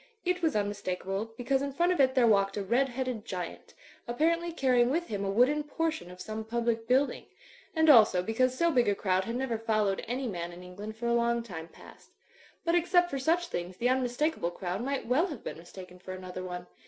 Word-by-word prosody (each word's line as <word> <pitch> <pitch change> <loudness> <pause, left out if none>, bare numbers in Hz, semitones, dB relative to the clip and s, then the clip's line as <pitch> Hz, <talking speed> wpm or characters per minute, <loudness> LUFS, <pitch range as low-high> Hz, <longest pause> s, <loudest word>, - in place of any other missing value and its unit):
It 360 +1 0
was 320 -6 +1
tmmistakable, 205 +1 -3
because 265 +2 0
in 280 -1 -3
front 345 +5 +2
of 360 - 0
it 260 -1 +4
there 255 -2 +5
walked 195 -2 +3
a 200 - -1
red 250 +7 +2
headed 250 -3 -3
giant, 180 -4 -6 0.3
apparently 335 +7 +1
carrying 255 -6 +3
with 335 +6 0
him 200 -2 -2
a 195 - -1
wooden 250 +9 +3
portion 315 - -3
of 180 0 -12
some 215 +3 -5
public 230 0 -1
building; 265 +3 +2 0.5
and 320 0 +3
also 215 -10 +7
because 255 +5 +1
so 340 0 +3
big 245 -6 +3
a 200 - +2
crowd 190 -1 0
had 230 - -3
never 245 -3 -1
followed 215 -3 0
any 255 +3 -2
man 175 -5 -4
in 175 +1 -11
England 205 +4 -8
for 235 - -5
a 235 - +2
long 235 0 +1
time 165 -7 -7
past. - - -16 0.6
But 335 - +2
except 350 +1 +3
for 275 - -2
such 335 +6 +1
things 175 +1 -4
the 245 +4 +1
unmistakable 255 - 0
crowd 180 +2 -4
might 275 +1 -2
well 275 +10 +2
have 295 -9 -8
been - - -6
mistaken 180 +1 -12
for 185 +1 -8
another 185 0 -7
one. 180 -1 -6
235 Hz, 215 wpm, -29 LUFS, 195-275 Hz, 0.6 s, also